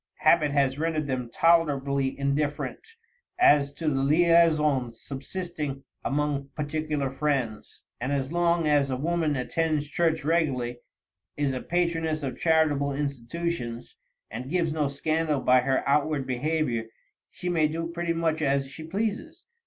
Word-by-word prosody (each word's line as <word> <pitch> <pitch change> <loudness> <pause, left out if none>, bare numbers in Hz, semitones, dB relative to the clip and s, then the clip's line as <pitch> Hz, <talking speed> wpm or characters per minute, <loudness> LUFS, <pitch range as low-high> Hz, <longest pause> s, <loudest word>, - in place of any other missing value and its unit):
Habit 150 - +4
has 140 -1 +1
rendered 160 -1 0
them 130 -3 -3
tolerably 140 -4 +2
indifferent 145 - -2 0.4
as 145 - +5
to 155 +3 -5
the 135 -3 +1
liaisons 150 -5 +3
subsisting 145 -1 -5 0.2
among 145 -1 -1
particular 150 -2 -2
friends, 135 -6 -2 0.2
and 125 +3 -2
as 135 0 -1
long 170 -1 +2
as 145 -2 +3
a 130 - -1
woman 160 +1 0
attends 150 +3 -1
church 160 -1 0
regularly, 135 -7 0 0.6
is 145 -2 0
a 130 - -3
patroness 165 -3 -1
of 135 - -4
charitable 155 -4 +2
institutions, 140 -2 -4 0.4
and 125 +4 -6
gives 165 -2 0
no 150 -2 0
scandal 155 +1 0
by 125 -1 +4
her 130 +1 +1
outward 145 0 +1
behavior, 130 -2 -1 0.4
she 180 - -7
may 165 -3 +2
do 165 +2 -3
pretty 170 0 -2
much 165 -1 0
as 140 -2 +1
she 150 +4 -9
pleases. 220 - -3
150 Hz, 135 wpm, -27 LUFS, 135-165 Hz, 0.6 s, as